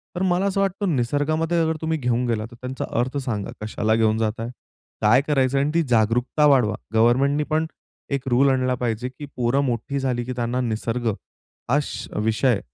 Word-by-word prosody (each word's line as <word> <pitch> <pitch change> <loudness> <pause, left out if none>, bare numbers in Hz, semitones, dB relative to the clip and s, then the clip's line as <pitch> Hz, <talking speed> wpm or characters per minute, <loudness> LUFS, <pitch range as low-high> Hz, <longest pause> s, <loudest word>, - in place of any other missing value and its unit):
तर 175 - -2
मला 185 +1 +2
असं 195 0 +1
वाटतं 195 -3 0
निसर्गामध्ये 155 +7 0
अगर 160 0 +1
तुम्ही 160 0 0
घेऊन 125 -3 0
गेला 110 -2 -1
तर - - -12
त्यांचा 130 +1 -4
अर्थ 130 +3 -1
सांगा 105 -6 -3
कशाला 110 0 0
घेऊन 110 -1 +2
जाताय? 110 +1 -1 0.5
काय 110 +5 +5
करायचं 135 -2 +2
आहे? 135 - +2
आणि 150 - -2
ती 170 - +4
जागरूकता 120 +6 +2
वाढवा 125 -8 +4 0.2
गव्हर्नमेंटनी 130 +6 +3
पण 155 +1 +1 0.5
एक 135 -1 -2
रूल 130 +3 +4
आणला 130 -1 +1
पाहिजे, 120 0 -2
की 130 +3 -9
पोरं 125 +3 +1
मोठी 125 +3 -2
झाली 125 -2 -1
की 125 - -4
त्यांना 120 +1 -1
निसर्ग, 115 0 -2 0.6
हा 140 +4 +4
स 120 -4 -6 0.2
विषय 110 +1 +2
125 Hz, 185 wpm, -23 LUFS, 115-145 Hz, 0.6 s, काय